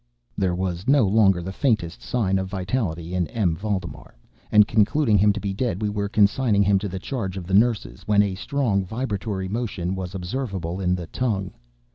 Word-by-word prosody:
There 90 +2 0
was 90 +1 -3
no 135 -4 +5
longer 95 -3 +3
the 95 - -5
faintest 95 - 0
sign 95 - 0
of 95 - -3
vitality 90 -3 -3
in 90 -2 0
M. 95 -8 0
Valdemar; 100 - -5 0.4
and 105 -1 +6
concluding 110 +3 +2
him 105 +2 +5
to 105 - -3
be 100 -1 -3
dead, 100 -3 -2
we 105 -1 -1
were 100 -1 -2
consigning 105 0 +3
him 100 0 +3
to 100 0 -4
the 95 - -5
charge 100 -3 -4
of 90 - -6
the 95 - -5
nurses, 100 - +1
when 105 -1 +4
a 100 -2 -1
strong 105 -1 0
vibratory 100 -2 -3
motion 100 -4 -3
was 95 -1 -5
observable 95 -3 -4
in 90 -1 +1
the 90 -2 -5
tongue. 100 -1 -2
100 Hz, 190 wpm, -23 LUFS, 90-110 Hz, 0.4 s, and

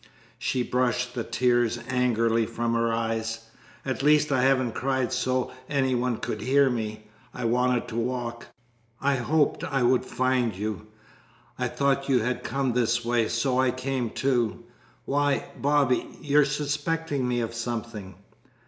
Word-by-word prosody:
She 125 - 0
brushed 125 0 0
the 120 -2 -2
tears 120 -1 +1
angrily 115 -3 +2
from 115 0 -2
her 115 0 +1
eyes. 115 0 -2 0.4
"At 130 -1 -2
least 150 +1 +4
I 130 -2 +3
haven't 130 -2 +3
cried 130 +1 -1
so 130 0 0 0.2
any 135 -3 +1
one 125 -1 0
could 115 -2 -4
hear 135 +3 +3
me. 110 -2 -4 0.3
I 125 - -4
wanted 125 +1 +1
to - - -6
walk. 120 -1 -3 0.5
I 140 0 +1
hoped 150 +4 +1
I 135 -3 0
would 125 +1 +3
find 130 -4 0
you. 105 +2 -4 0.7
I - - +1
thought 140 0 0
you 130 - +4
had 125 +2 -2
come 135 -3 -1
this 120 0 +1
way, 120 -2 +2
so 125 +2 0
I 130 -1 +3
came, 130 -1 -2
too. 120 -3 0 0.4
Why, 145 0 +1
Bobby, 140 -3 +2
you're 145 0 +3
suspecting 145 -1 -1
me 120 -1 0
of 115 -1 -3
something!" 115 -5 -5
125 Hz, 150 wpm, -26 LUFS, 115-135 Hz, 0.7 s, least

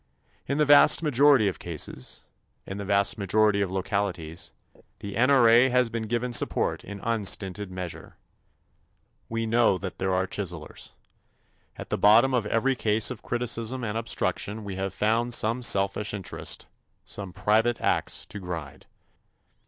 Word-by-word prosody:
In 140 - -1
the 150 - +3
vast 145 +3 +6
majority 140 -5 +4
of 95 - -3
cases, 75 -6 -4 0.4
in 95 +1 -7
the 100 - -5
vast 100 +3 +1
majority 105 +1 +2
of 100 - -1
localities 95 -4 -2 0.5
the 100 -1 -8
N.R.A. 125 -1 +5
has 125 -2 +2
been 115 -2 -4
given 120 +2 -2
support - - +1
in 100 0 -8
unstinted 105 -3 -1
measure. 90 -2 -7 1.1
We 115 0 -2
know 115 -3 +3
that 95 -1 -7
there 95 0 -1
are 95 0 +1
chiselers. 90 -6 -6 0.8
At - - -10
the - - -1
bottom 115 +6 +5
of 120 -4 0
every 125 +5 +1
case 110 -2 0
of 125 - -7
criticism 120 +1 -2
and 110 -2 -3
obstruction 110 -1 -2
we 100 -2 -6
have 95 0 -3
found 115 +3 +1
some 115 +4 -1
selfish 105 -2 +1
interest, 95 -3 -3 0.4
some 100 -3 -5
private 110 +5 +1
ax - - -1
to 105 - -9
grind. 85 -7 -7
105 Hz, 145 wpm, -26 LUFS, 95-120 Hz, 1.1 s, vast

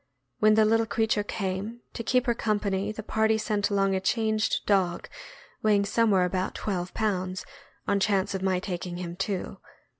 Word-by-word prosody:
When 215 0 +5
the 220 0 +5
little 225 +1 +3
creature 220 -1 +1
came, 205 +3 -4
to - - -4
keep 250 +2 +2
her 240 - +2
company 205 -3 -1
the 215 0 -7
party 220 +1 +2
sent 210 -1 0
along 195 -1 +2
a 190 - +1
changed 215 +2 0
dog 185 -4 +1 0.5
weighing 205 -2 +3
somewhere 205 -3 +3
about 185 +1 -2
twelve 180 -3 -3
pounds, 185 -4 -1 0.4
on 200 0 +2
chance 195 -1 +1
of 190 - -3
my 190 -1 +1
taking 180 -2 -5
him 175 -1 -5
too. 190 0 -3
200 Hz, 170 wpm, -27 LUFS, 190-220 Hz, 0.5 s, When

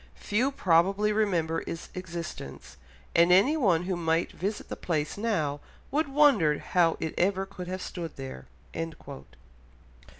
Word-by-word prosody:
Few 235 +6 0
probably 195 -1 +3
remember 175 -7 0
its 165 - -6
existence; 170 - -7 0.4
and 170 +1 +5
anyone 195 - +4
who 185 0 -1
might 165 0 0
visit 205 +3 -4
the - - -5
place 155 -3 -2
now 165 -10 -1 0.3
would 305 +2 +1
wonder 270 - +4
how 170 -2 +2
it 160 - -3
ever 190 +1 +2
could 190 -2 -9
have 185 +1 -4
stood 170 -3 -6
there." 135 - -8
180 Hz, 130 wpm, -28 LUFS, 165-205 Hz, 0.4 s, and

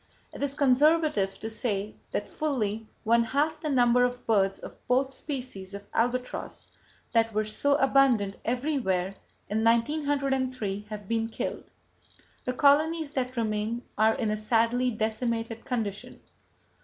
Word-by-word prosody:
It - - -9
is 280 -1 0
conservative 285 -7 +3
to 220 - -3
say 210 -3 -2 0.2
that - - -2
fully 225 -8 -2 0.2
one 235 +1 +4
half 290 +6 0
the 305 - -2
number 245 -2 +4
of 245 0 -1
birds 195 -3 +2
of - - -9 0.2
both 260 +2 +2
[Page - - -6
142] 275 -4 -2
species 195 -6 -8
of 200 - -8
albatross 250 +2 -2 0.5
that 225 -1 +3
were 215 0 +1
so 280 +7 +2
abundant 270 -8 +3
everywhere 235 -8 0 0.3
in 215 +2 -1
1903 255 -4 0
have 210 -2 -7
been 225 0 0
killed. - - -5 0.8
The 250 - -1
colonies 305 +3 +3
that 255 -2 -3
remain 220 +1 -1
are 220 +1 +4
in 220 -3 -1
a 215 - -1
sadly 230 +3 +2
decimated 225 0 -2
condition. 220 -5 -4
235 Hz, 145 wpm, -28 LUFS, 215-270 Hz, 0.8 s, one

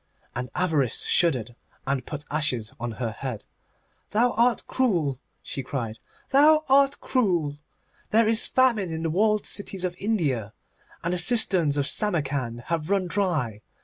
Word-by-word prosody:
And 125 +1 -4
Avarice 160 -9 +1
shuddered, 125 -9 +1 0.3
and 135 -2 -1
put 150 -1 -6
ashes 135 -7 -1
on 120 -1 -4
her 115 0 -3
head. 120 -1 -6 0.6
'Thou 240 +4 +2
art 235 +1 +2
cruel,' 170 - 0 0.2
she 135 - -4
cried; 120 -4 -5 0.3
'thou 305 +3 +6
art 275 +1 +4
cruel. 175 - 0 0.5
There 225 +1 +4
is 225 0 +3
famine 235 -8 +2
in 160 0 -4
the 165 - -1
walled 210 +4 +2
cities 195 -2 -2
of 180 -1 -2
India, 145 - -1 0.5
and 170 +2 -1
the 180 - -1
cisterns 180 - +3
of 140 - +1
Samarcand 140 - -1
have 160 +4 -3
run 195 -2 +2
dry. 165 - -1
165 Hz, 145 wpm, -25 LUFS, 135-210 Hz, 0.6 s, thou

